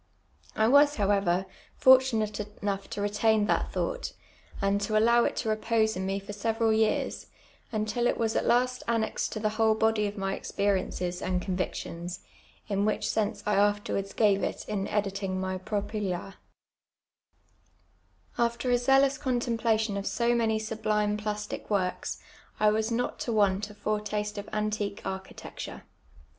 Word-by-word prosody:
I 220 - +3
was, 285 +3 +6
however, 195 -3 +2 0.3
fortunate 250 -5 +4 0.2
enough 200 -1 -2
to 205 - -4
retain 210 +1 +2
that - - 0
thought, - - -2 0.5
and 200 0 +1
to 215 +1 +1
allow 235 +2 +5
it - - -1
to 225 - -2
repose 220 0 +1
in 190 +1 -3
me 195 0 0
for 200 +1 -8
several 225 +1 +1
years, 220 0 0 0.4
tmtil 215 +2 0
it - - +1
was 225 -1 0
at - - +1
la^ 250 +1 +2
annexed 230 -1 0
to 215 - -3
the 215 0 +1
whole 220 -1 +4
body 220 -1 +2
of 205 +1 -6
my 195 0 -1
exper' 200 0 0
and 180 0 -2
con^ 190 -3 -2
ictions, 175 -1 -4 0.5
in 200 -2 0
which 215 0 0
sense 215 0 -1
I 210 - +1
after 205 +1 +2
wards 195 0 -2
gave 205 -3 +3
it - - -3
in 200 -2 -2
ivtiUii;^ 195 -2 -1
my 185 0 -2
F 185 0 -7
ropy 210 +1 -1
la 180 +2 -4
a. - - -22 2.1
After 235 +1 0
a 245 - +4
zealous 270 +2 +4
contemjjlation 230 -5 0
of 200 - -5
so 235 0 +1
many 225 -2 +2
sublime 215 -1 0
plastic 210 0 -4
works. 185 -3 -1 0.4
I 215 0 +5
was 220 +1 0
not 245 +2 -1
to 235 - -2
want 205 -1 +2
a 210 - -12
foretaste 210 0 -2
of 205 - -8
antique 210 -1 -2
architecture. 190 0 -7
210 Hz, 160 wpm, -28 LUFS, 200-225 Hz, 2.1 s, was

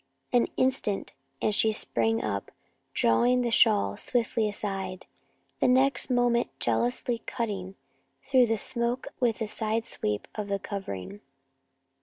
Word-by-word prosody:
An 245 -1 +4
instant 255 -6 0 0.3
and 215 - +2
she 220 +1 +3
sprang 115 - 0
up, 100 0 -3 0.4
drawing 245 - +3
the 240 - -1
shawl 220 -3 +4
swiftly 230 -3 0
aside, 195 -2 -4 0.5
the - - +3
next 265 +2 +3
moment 245 -1 +2
jealously 240 0 0
cutting 200 -6 -3 0.5
through 260 -3 +4
the 225 0 +1
smoke 240 +2 -1
with 235 -3 +1
a - - -3
side 220 +1 -1
sweep 105 0 -3
of 210 -2 -4
the 200 0 0
covering. 195 - -6
220 Hz, 130 wpm, -28 LUFS, 195-245 Hz, 0.5 s, An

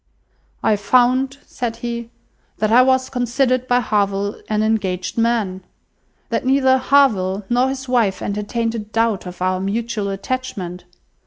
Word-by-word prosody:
"I 210 - +3
found," 255 +6 +2
said 235 -2 -4
he, 235 -1 -4 0.5
"that 215 0 0
I 245 +2 +7
was 260 0 +3
considered 255 +1 0
by 245 0 +3
Harville 200 -2 -1
an 215 0 +1
engaged 190 -5 -1
man! 225 -5 0 0.7
That - - -1
neither 260 0 +3
Harville 210 -8 +2
nor 250 +2 +3
his 265 0 -5
wife 235 -6 +1
entertained 215 +3 -2
a 230 - -3
doubt 215 -2 -1
of 180 0 -6
our 185 0 +1
mutual 210 +1 -2
attachment. 195 -4 -4
230 Hz, 140 wpm, -20 LUFS, 200-255 Hz, 0.7 s, I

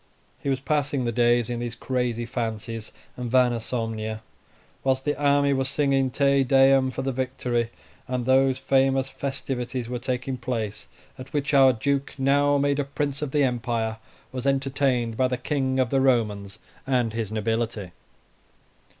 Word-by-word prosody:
He 140 - -2
was 135 -1 +1
passing 145 -2 0
the 120 - 0
days 120 0 +3
in 120 -1 -3
these 120 -1 -4
crazy 125 -2 -2
fancies, 115 -2 -4 0.2
and 125 -1 -4
vana 125 -1 +3
somnia, 110 -2 -3 0.6
whilst 130 0 +1
the 145 - +1
army 140 -1 +3
was 135 0 0
singing 135 -2 +1
"Te 140 +1 +3
Deum" 135 0 +5
for 130 +1 -4
the 135 - -1
victory, 125 -2 -1 0.4
and 125 -1 -2
those 130 0 +4
famous 135 0 +2
festivities 130 -3 -4
were 125 -1 -3
taking 130 +1 -3
place 115 -4 -4 0.3
at 130 +1 -9
which 145 -1 -1
our 135 -1 +7
Duke, 140 +4 -1
now 145 +1 +3
made 140 0 +1
a - - +2
Prince 140 0 -3
of 150 - -2
the 145 +1 +2
Empire, 115 -3 -1 0.3
was 130 +1 -4
entertained 135 -4 0
by 130 0 +3
the 125 0 -2
King 130 0 -1
of 130 -3 +1
the 135 - +3
Romans 105 -6 +1 0.3
and 125 -4 +1
his 110 -2 -3
nobility. 110 -3 -2
130 Hz, 160 wpm, -25 LUFS, 120-135 Hz, 0.6 s, our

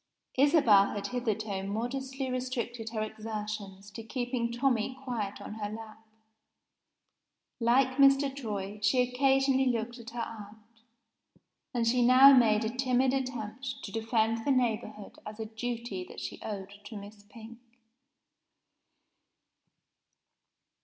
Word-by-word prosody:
Isabel 260 -9 +5
had 200 -1 -4
hitherto 215 -5 -2
modestly 260 +6 -3
restricted 245 -3 -3
her 220 -1 -2
exertions 210 -2 -6
to 225 - -7
keeping 240 0 -2
Tommie 250 0 0
quiet 220 -6 -3
on - - -8
her 210 -1 -4
lap. 220 0 -9 1.6
Like 255 +2 +3
Mr. 275 0 +5
Troy, 210 -5 -5
she 210 +6 +3
occasionally 265 +1 +2
looked 240 0 -2
at 235 0 -9
her 235 0 -5
aunt 215 -2 -7 1.1
and 240 -3 0
she 245 +2 +3
now 260 +3 +8
made 220 -3 +4
a 230 +3 -3
timid 255 0 +2
attempt 255 0 -4
to - - -6
defend 225 0 0
the - - -2
neighborhood 220 -5 -1
as 215 +1 -9
a 220 - -3
duty 225 -3 -4
that - - -9
she - - -6
owed 200 -1 -7
to 215 0 -8
Miss 205 +1 -11
Pink. 230 +1 -12
230 Hz, 125 wpm, -30 LUFS, 215-255 Hz, 1.6 s, now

